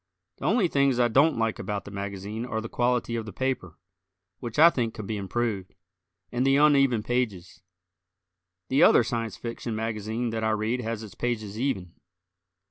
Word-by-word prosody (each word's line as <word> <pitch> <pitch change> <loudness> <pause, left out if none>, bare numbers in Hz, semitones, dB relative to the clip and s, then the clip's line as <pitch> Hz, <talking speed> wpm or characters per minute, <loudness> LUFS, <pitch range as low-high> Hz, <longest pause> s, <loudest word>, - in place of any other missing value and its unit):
The - - -7
only 210 -2 +3
things 140 -5 +2
I 120 -1 +4
don't 140 +6 +4
like 115 -1 0
about 105 -1 -4
the 100 - -9
magazine 100 +2 -5
are 115 -3 -3
the 110 - -5
quality 120 0 0
of 115 -1 -4
the - - -6
paper, 125 -7 -3 0.6
which 120 -1 -6
I 165 +3 +8
think 115 -6 -2
could 110 - -6
be 110 - -3
improved, 100 -1 -3 0.6
and 125 +1 0
the 135 0 +4
uneven 140 -6 +4
pages. 105 - -2 1.1
The 135 +2 +3
other - - +7
Science 115 -1 -3
Fiction 115 -1 -5
magazine 110 +1 -2
that 110 0 -3
I 110 - +2
read 115 +4 -1
has 115 -1 -4
its 105 -4 -10
pages 110 -3 -3
even. 95 -10 -2
115 Hz, 175 wpm, -27 LUFS, 105-125 Hz, 1.1 s, I